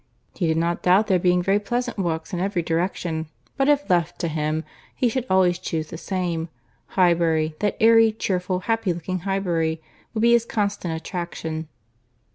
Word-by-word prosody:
—"He 175 Hz, -, -1 dB
did 160 Hz, 0 st, +1 dB
not 170 Hz, +1 st, 0 dB
doubt 185 Hz, +4 st, +4 dB
there 190 Hz, -4 st, +2 dB
being 180 Hz, 0 st, +2 dB
very 195 Hz, +3 st, +3 dB
pleasant 240 Hz, +1 st, -2 dB
walks 165 Hz, -3 st, -2 dB
in 175 Hz, -, -1 dB
every 190 Hz, -2 st, -1 dB
direction, 165 Hz, -1 st, -2 dB, 0.3 s
but 275 Hz, +1 st, +2 dB
if 290 Hz, 0 st, +2 dB
left 175 Hz, -2 st, +1 dB
to 170 Hz, -, 0 dB
him, 155 Hz, 0 st, -1 dB, 0.3 s
he 250 Hz, -, +2 dB
should 250 Hz, +2 st, -2 dB
always 180 Hz, -2 st, +3 dB
chuse 160 Hz, -4 st, -3 dB
the -, -, -5 dB
same. 175 Hz, -4 st, -2 dB, 0.5 s
Highbury, 165 Hz, -3 st, +3 dB
that 205 Hz, -1 st, 0 dB
airy, 225 Hz, 0 st, +6 dB
cheerful, 185 Hz, -3 st, -2 dB
happy 225 Hz, -2 st, 0 dB
looking 180 Hz, +2 st, -4 dB
Highbury, 170 Hz, -4 st, -1 dB, 0.4 s
would 215 Hz, -, 0 dB
be 235 Hz, +1 st, +5 dB
his 235 Hz, -1 st, +5 dB
constant 200 Hz, -7 st, -2 dB
attraction." 165 Hz, -3 st, -5 dB
180 Hz, 170 wpm, -23 LUFS, 165-205 Hz, 0.5 s, airy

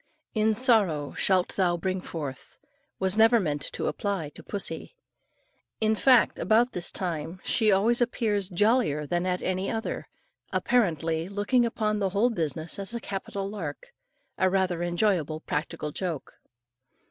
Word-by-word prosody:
"In 220 Hz, 0 st, +2 dB
sorrow 205 Hz, -, +3 dB
shalt 185 Hz, -3 st, +2 dB
thou 175 Hz, -3 st, +2 dB
bring 185 Hz, +2 st, -2 dB
forth," 145 Hz, -7 st, -7 dB, 0.4 s
was 190 Hz, 0 st, 0 dB
never 225 Hz, +2 st, +6 dB
meant 150 Hz, -7 st, -1 dB
to -, -, -3 dB
apply 195 Hz, -7 st, -2 dB
to -, -, -13 dB
pussy. 205 Hz, -, -5 dB, 0.8 s
In 220 Hz, 0 st, +2 dB
fact 250 Hz, +1 st, +4 dB
about 235 Hz, +3 st, +3 dB
this 175 Hz, -1 st, -1 dB
time 170 Hz, -1 st, -4 dB
she 220 Hz, -3 st, +2 dB
always 225 Hz, +5 st, +3 dB
appears 215 Hz, -5 st, 0 dB
jollier 205 Hz, -, +2 dB
than 175 Hz, +4 st, -1 dB
at 180 Hz, 0 st, -1 dB
any 185 Hz, +1 st, -1 dB
other, 225 Hz, 0 st, -3 dB, 0.4 s
apparently 165 Hz, -8 st, +1 dB
looking 210 Hz, +5 st, +2 dB
upon 215 Hz, -2 st, -1 dB
the 195 Hz, -2 st, +1 dB
whole 210 Hz, +6 st, +2 dB
business 160 Hz, -3 st, -2 dB
as 200 Hz, +4 st, -1 dB
a -, -, -2 dB
capital 195 Hz, -1 st, -4 dB
lark 485 Hz, -, -7 dB, 0.5 s
a 185 Hz, -, +4 dB
rather 185 Hz, -2 st, 0 dB
enjoyable 175 Hz, -3 st, 0 dB
practical 150 Hz, 0 st, -3 dB
joke. 170 Hz, -3 st, -4 dB
190 Hz, 145 wpm, -27 LUFS, 170-220 Hz, 0.8 s, never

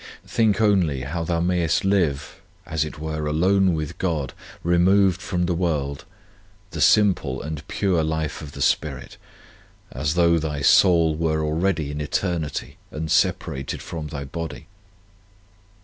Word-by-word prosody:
Think 110 Hz, -4 st, +1 dB
only 95 Hz, -11 st, +2 dB
how 80 Hz, +5 st, -3 dB
thou 85 Hz, 0 st, -1 dB
mayest 85 Hz, -1 st, +1 dB
live, 80 Hz, -7 st, 0 dB, 0.2 s
as 80 Hz, -1 st, -1 dB
it 75 Hz, -, -7 dB
were, 80 Hz, 0 st, -4 dB
alone 90 Hz, +4 st, +2 dB
with 75 Hz, -2 st, -5 dB
God, 80 Hz, -8 st, -2 dB, 0.3 s
removed 90 Hz, +2 st, +3 dB
from 90 Hz, -3 st, -1 dB
the 90 Hz, -, 0 dB
world, 75 Hz, -5 st, -2 dB, 0.7 s
the -, -, -4 dB
simple 90 Hz, -11 st, +3 dB
and 75 Hz, 0 st, -6 dB
pure 90 Hz, -5 st, 0 dB
life 80 Hz, -1 st, -2 dB
of 75 Hz, -2 st, -9 dB
the 70 Hz, -, -2 dB
spirit, 70 Hz, -5 st, -1 dB, 0.7 s
as 75 Hz, +1 st, -2 dB
though 85 Hz, -1 st, +4 dB
thy 75 Hz, -2 st, -3 dB
soul 85 Hz, -1 st, +5 dB
were 80 Hz, -1 st, 0 dB
already 80 Hz, -1 st, 0 dB
in 75 Hz, +1 st, -4 dB
eternity 80 Hz, 0 st, -3 dB
and 80 Hz, 0 st, -5 dB
separated 65 Hz, -1 st, 0 dB
from 80 Hz, -2 st, -6 dB
thy 70 Hz, -1 st, -6 dB
body. 80 Hz, +4 st, -6 dB
80 Hz, 140 wpm, -23 LUFS, 75-90 Hz, 0.7 s, soul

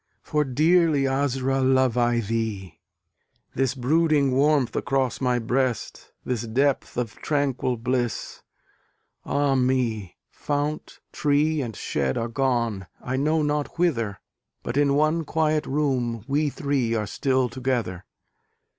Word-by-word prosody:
For 150 Hz, 0 st, +1 dB
dearly, 155 Hz, +1 st, +3 dB
Asra! 135 Hz, -1 st, 0 dB
love 130 Hz, -2 st, +3 dB
I 120 Hz, -1 st, +2 dB
thee! 105 Hz, -6 st, -3 dB, 0.7 s
This 135 Hz, 0 st, 0 dB
brooding 145 Hz, +1 st, +2 dB
warmth 140 Hz, -1 st, +2 dB
across 135 Hz, 0 st, 0 dB
my 125 Hz, -1 st, +2 dB
breast, 125 Hz, +1 st, -2 dB
This 125 Hz, -4 st, -1 dB
depth 130 Hz, +5 st, 0 dB
of 120 Hz, -3 st, -3 dB
tranquil 135 Hz, -4 st, -1 dB
bliss 120 Hz, -1 st, -2 dB, 0.8 s
ah, 145 Hz, -1 st, +1 dB
me! 125 Hz, -7 st, 0 dB
Fount, 145 Hz, +1 st, -3 dB
tree 150 Hz, +1 st, +1 dB
and 115 Hz, -5 st, -5 dB
shed 70 Hz, -3 st, -1 dB
are 115 Hz, -, -1 dB
gone, 115 Hz, -6 st, -1 dB
I 125 Hz, -, -3 dB
know 155 Hz, +3 st, +1 dB
not 150 Hz, +1 st, -2 dB
whither, 115 Hz, -13 st, 0 dB, 0.4 s
But 120 Hz, -, -4 dB
in 140 Hz, -1 st, +3 dB
one 155 Hz, +3 st, +2 dB
quiet 155 Hz, -1 st, 0 dB
room 125 Hz, -6 st, -1 dB
we 145 Hz, +2 st, +1 dB
three 135 Hz, -5 st, -1 dB
are 105 Hz, -1 st, -1 dB
still 130 Hz, +4 st, 0 dB
together. 120 Hz, -7 st, -2 dB
130 Hz, 125 wpm, -24 LUFS, 120-145 Hz, 0.8 s, dearly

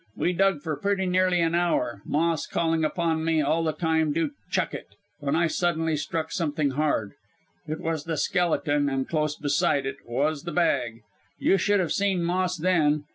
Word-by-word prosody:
We 180 Hz, -, 0 dB
dug 190 Hz, -4 st, +2 dB
for 155 Hz, -2 st, -2 dB
pretty 195 Hz, +4 st, 0 dB
nearly 180 Hz, -1 st, +2 dB
an 165 Hz, 0 st, +1 dB
hour, 125 Hz, -, 0 dB
Moss 165 Hz, +1 st, 0 dB
calling 165 Hz, -1 st, 0 dB
upon 160 Hz, 0 st, 0 dB
me 160 Hz, -1 st, +2 dB
all 155 Hz, +3 st, +1 dB
the 160 Hz, -, +1 dB
time 160 Hz, -1 st, 0 dB
to 165 Hz, +11 st, 0 dB, 0.2 s
'chuck -, -, 0 dB
it,' -, -, -8 dB, 0.2 s
when 145 Hz, 0 st, -1 dB
I 170 Hz, +1 st, +3 dB
suddenly 165 Hz, -1 st, 0 dB
struck 160 Hz, +2 st, -3 dB
something 155 Hz, -5 st, 0 dB
hard 135 Hz, -8 st, 0 dB, 0.6 s
it 155 Hz, +1 st, -3 dB
was 160 Hz, -2 st, -3 dB
the 160 Hz, -1 st, -2 dB
skeleton 145 Hz, -5 st, +1 dB
and 135 Hz, -1 st, -2 dB
close 150 Hz, -2 st, 0 dB
beside 145 Hz, -1 st, +1 dB
it, 135 Hz, +1 st, -4 dB
was 145 Hz, +5 st, -1 dB
the 170 Hz, -, -6 dB
bag. 125 Hz, -10 st, 0 dB, 0.3 s
You 195 Hz, -, +3 dB
should 205 Hz, +2 st, +2 dB
have 175 Hz, -4 st, 0 dB
seen 195 Hz, -3 st, +1 dB
Moss 180 Hz, +1 st, 0 dB
then. 155 Hz, -4 st, +2 dB
160 Hz, 185 wpm, -26 LUFS, 145-175 Hz, 0.6 s, I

